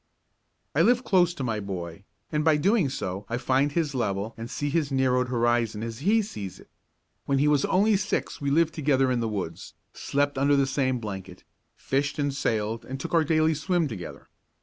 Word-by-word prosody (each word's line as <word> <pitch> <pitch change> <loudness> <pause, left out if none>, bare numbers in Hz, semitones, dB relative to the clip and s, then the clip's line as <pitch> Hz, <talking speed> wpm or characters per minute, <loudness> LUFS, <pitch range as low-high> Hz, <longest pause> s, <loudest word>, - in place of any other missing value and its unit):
I 145 - +3
live 245 +6 +4
close 180 -6 +3
to 140 - -4
my 115 -3 -1
boy, 95 -2 -6 0.3
and 150 0 0
by 160 -1 +4
so 150 - -1
doing 195 - +3 0.4
I 115 - -1
find 130 +3 +1
his 155 -2 -1
level 105 -3 -2
and 115 +1 -7
see 145 +1 -3
his 150 -2 0
narrowed 130 -1 +2
horizon 120 -3 0
as 115 -1 -5
he 210 +8 +3
sees 100 - -7
it. - - -18 0.6
When 140 - +2
he 145 +2 +3
was 145 -2 +3
only 205 +3 +3
six 190 -4 -2
we 140 - 0
lived 160 +3 +2
together 135 -4 +2
in 125 - +1
the 115 -1 -1
woods, 100 -3 -5 0.2
slept 145 -1 -1
under 140 +1 +4
the 140 -1 +3
same 130 -1 0
blanket, 95 -5 -7 0.3
fished 140 +2 -1
and 145 -1 0
sailed 110 -4 -1
and 135 +1 -6
took - - -6
our 165 -1 +5
daily 155 +1 +2
swim 165 +2 0
together. 105 -9 -8
135 Hz, 195 wpm, -26 LUFS, 115-155 Hz, 0.6 s, our